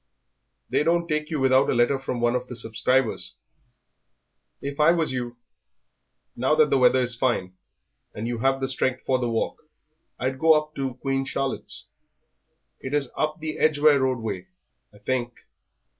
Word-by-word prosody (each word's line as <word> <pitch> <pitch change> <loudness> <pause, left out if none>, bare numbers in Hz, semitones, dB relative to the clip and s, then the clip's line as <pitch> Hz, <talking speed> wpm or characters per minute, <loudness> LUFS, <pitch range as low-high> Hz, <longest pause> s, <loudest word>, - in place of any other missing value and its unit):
"They - - +1
don't 170 +2 +1
take 150 -1 -1
you 155 -3 -2
without 130 0 +4
a - - +1
letter 120 +3 +2
from 130 -2 -4
one 120 0 +2
of 125 0 -2
the 125 - -7
subscribers. 115 - 0 1.2
If 140 +1 -6
I 150 +1 +6
was 165 -4 +2
you, 120 -2 -4 1.0
now 130 +5 +2
that 155 -2 +4
the 135 - +4
weather 130 0 +5
is 125 -1 0
fine 115 -7 -1 0.6
and 110 +2 -4
you 120 -1 -3
have 135 +2 +1
strength 130 -1 0
for 130 -1 +1
the 120 -1 -1
walk, 115 -1 -2 0.6
I'd 130 +1 -2
go 160 +1 +6
up 155 0 0
to 135 -3 -3
Queen 135 +1 -1
Charlotte's. 135 0 -3 0.9
It 130 +2 -4
is 140 -3 +1
up 155 +1 -1
the 155 0 -4
Edgware 150 -1 +4
Road 130 -1 +1
way, 115 - -5 0.4
I 105 - -18
think. 120 +2 -2
130 Hz, 165 wpm, -25 LUFS, 120-150 Hz, 1.2 s, I